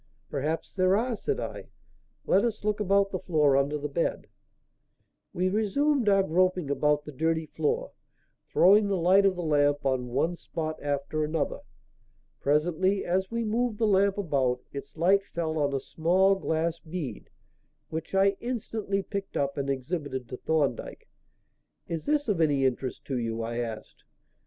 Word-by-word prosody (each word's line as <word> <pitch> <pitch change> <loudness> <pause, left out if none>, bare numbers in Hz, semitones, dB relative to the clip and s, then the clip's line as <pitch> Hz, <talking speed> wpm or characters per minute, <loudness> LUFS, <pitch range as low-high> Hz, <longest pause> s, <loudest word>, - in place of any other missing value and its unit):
"Perhaps 150 +3 -2
there 185 0 +3
are," 240 +2 0
said 430 - -2
I. - - -5 0.6
"Let 195 - +3
us 225 -3 -2
look 210 0 0
about 200 -1 +2
the 185 - -2
floor 150 -6 +2
under 140 +2 +1
the 150 0 -3
bed." 150 +4 -1 1.1
We 180 +1 0
resumed 220 +5 +1
our 195 -1 +4
groping 180 -3 +1
about 150 +1 +1
the 150 - -7
dirty 160 +3 0
floor, 470 - -2 0.6
throwing 205 +3 +6
the 195 -1 0
light 190 +3 +5
of 190 - +1
the 175 - -4
lamp 145 -2 +2
on 130 -2 0
one 145 +8 0
spot 155 -2 -5
after 145 +1 -1
another. 155 0 -1 0.8
Presently, 175 +7 +1
as 190 +2 0
we 230 0 -2
moved 230 +1 0
the 225 - +1
lamp 200 -1 +3
about, 135 -9 0
its 140 +2 -8
light 190 +4 +4
fell 160 -4 -3
on 145 -1 +1
a 135 - 0
small 180 +7 +2
glass 165 -3 -1
bead, 155 - -6 0.6
which 160 +4 -5
I 195 0 +3
instantly 220 -5 -3
picked 200 0 -5
up 140 0 0
and 140 0 -2
exhibited 135 -2 -3
to 125 - -6
Thorndyke. 155 -2 -1 0.8
"Is 165 -2 -4
this 295 -1 +1
of 195 -6 +1
any 145 -4 +3
interest 130 0 -2
to 130 -3 -2
you?" 115 -1 -2
I 115 +1 -4
asked. 115 -2 -6
165 Hz, 160 wpm, -28 LUFS, 145-195 Hz, 1.1 s, throwing